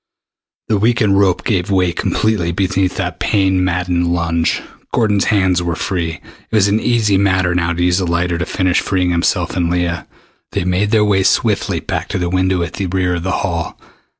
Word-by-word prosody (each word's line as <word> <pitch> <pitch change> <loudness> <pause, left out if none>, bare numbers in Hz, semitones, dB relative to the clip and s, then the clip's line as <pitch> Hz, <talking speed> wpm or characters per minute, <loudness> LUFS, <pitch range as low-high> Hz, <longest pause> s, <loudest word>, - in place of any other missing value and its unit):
The 105 -2 +1
weakened 110 -3 +2
rope 95 -3 +2
gave 95 -5 0
way 90 -3 +2
completely 105 -5 0
beneath 95 +1 0
that - - -3
pain 95 -2 +1
maddened 90 -1 0
lunge. 85 -1 0 0.3
Gordon's 105 -5 +1
hands 95 -4 +2
were 85 -1 -2
free. 85 -4 -2 0.4
It - - -3
was 105 -2 +4
an 105 +2 +2
easy 110 -4 +2
matter 95 -2 +2
now 85 -1 0
to 85 0 -1
use 90 +1 +2
the 95 - -1
lighter 85 0 0
to 85 - -1
finish 95 -2 +1
freeing 90 -2 0
himself 85 +1 0
and 85 -2 0
Leah. 85 0 -1 0.5
They - - -1
made 90 +3 0
their 105 -1 +3
way 100 -2 +2
swiftly - - +1
back - - -3
to - - -3
the 90 -1 -1
window 95 -1 +1
at 85 - -6
the 100 - -3
rear 90 0 0
of 85 - -2
the 95 +2 -2
hall. 85 -3 -3
90 Hz, 195 wpm, -17 LUFS, 85-100 Hz, 0.5 s, was